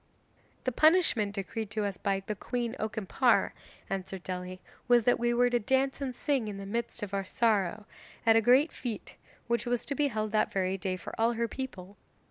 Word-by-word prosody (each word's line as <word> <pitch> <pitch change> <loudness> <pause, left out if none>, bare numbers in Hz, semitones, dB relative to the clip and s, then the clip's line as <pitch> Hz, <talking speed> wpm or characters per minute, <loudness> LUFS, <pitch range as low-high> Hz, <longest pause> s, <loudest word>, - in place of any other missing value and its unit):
'The 255 - 0
punishment 255 - +3
decreed 215 +2 -4
to 215 0 -1
us 200 -1 -2
by 195 0 -1
the 215 - -2
Queen 240 +3 -3
Okimpare,' 220 +3 +2 0.4
answered 190 -1 -4
Dely, 185 0 -5 0.3
'was 240 -1 +5
that 245 +2 +3
we 240 0 +2
were 245 +1 +3
to 240 - +3
dance 265 +4 +1
and 260 -3 -3
sing 275 -6 0
in 205 -1 -5
the 195 - -7
midst 235 +2 -3
of 200 -1 -5
our 195 0 0
sorrow, 210 -1 +1 0.4
at 225 -1 +6
a 225 - +6
great 255 +7 +5
fete 235 -5 -5 0.3
which 235 -1 -1
was 245 -1 0
to 280 - -1
be 290 +1 +2
held 215 -4 -2
that 215 - +2
very 190 -1 0
day 185 -1 -2
for 180 - -8
all 230 +1 +3
her 235 0 0
people. 205 -7 -7
225 Hz, 200 wpm, -30 LUFS, 195-245 Hz, 0.4 s, at